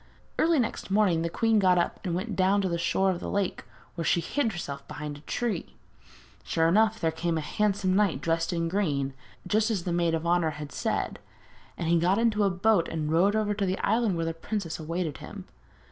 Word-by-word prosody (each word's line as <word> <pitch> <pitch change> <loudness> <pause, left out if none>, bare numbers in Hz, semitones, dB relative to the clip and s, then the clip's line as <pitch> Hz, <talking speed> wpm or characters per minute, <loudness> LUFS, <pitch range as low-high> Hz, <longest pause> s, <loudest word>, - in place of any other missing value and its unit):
Early 330 0 +4
next 235 -6 -2
morning 195 -5 +3
the 170 - -1
queen 225 +4 +2
got 185 -2 +4
up 175 - 0
and 175 -4 -2
went 200 +4 -3
down 195 +2 +3
to 190 - 0
the 170 -1 -1
shore 190 +3 +2
of 175 - -3
the - - -5
lake, 200 -2 -2 0.3
where 170 - -4
she 170 - +2
hid 230 +6 -1
herself 140 -6 -6
behind 150 -1 -6
a 145 - -12
tree. 215 +2 -3 0.7
Sure 165 0 +1
enough 220 +5 +3
there 160 - +1
came 165 +1 -1
a - - -1
handsome 195 +3 0
knight 200 -4 +2
dressed 165 +1 0
in 165 -1 -1
green, 150 -8 -1 0.3
just 215 +1 +2
as 200 -6 -1
the 175 - -2
maid 170 -1 +2
of 165 +1 -3
honour 170 -1 +2
had 150 -2 -7
said, - - -2 0.6
and 165 - -3
he 170 0 +4
got 180 +4 +2
into 225 -2 +2
a - - +3
boat 190 0 +2
and 155 -2 -3
rowed 190 +6 +3
over 215 -1 +1
to 205 -1 -1
the 185 +1 0
island 220 -2 +2
where 165 - -1
the 165 - -2
princess 170 0 -4
awaited 165 0 -3
him. - - -9
180 Hz, 220 wpm, -27 LUFS, 165-205 Hz, 0.7 s, Early